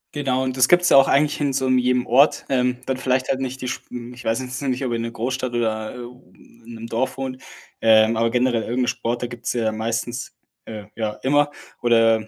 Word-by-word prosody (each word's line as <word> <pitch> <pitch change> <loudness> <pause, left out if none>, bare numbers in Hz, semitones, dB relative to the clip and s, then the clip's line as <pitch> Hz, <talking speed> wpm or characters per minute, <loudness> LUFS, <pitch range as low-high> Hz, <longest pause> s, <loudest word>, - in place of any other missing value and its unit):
Genau, 130 -3 0
und 130 -1 -2
das 130 0 +5
gibt's 175 0 +5
ja - - +7
auch 135 - +7
eigentlich 150 +2 +2
in 140 -2 +1
so 130 0 0
'nem 130 -1 +3
jedem 125 0 +1
Ort, 135 +5 +3
ähm, 125 -2 +1
dann 130 - -2
vielleicht 130 0 0
halt 130 - 0
nicht 130 0 -4
die 130 - -4
sch - - -4
m 120 0 -8
ich 125 - -12
weiß 115 +3 0
jetzt 125 +1 -6
nicht, 130 -1 -1
ob 125 - -2
in 115 - -1
'ner 115 - -3
Großstadt 125 +2 -3
oder, 110 -1 -2
äh, - - -9
u 125 +1 -14
i 115 - -21
in 120 - -9
'nem 115 0 -8
Dorf 130 +4 -2
wohnt, 130 -1 -5 0.4
ähm, 110 0 +5
aber 115 +1 +2
generell 120 -1 +1
irgend 125 +3 -1
'n - - -6
Sport, 120 +1 -2
da - - -1
gibt's 120 -1 -5
ja 115 -2 0
meistens 115 +2 -4 0.3
äh, 110 -2 -7
ja 110 -1 -2
immer 145 +2 +3 0.3
oder 115 -2 +3
125 Hz, 245 wpm, -22 LUFS, 115-130 Hz, 0.4 s, ja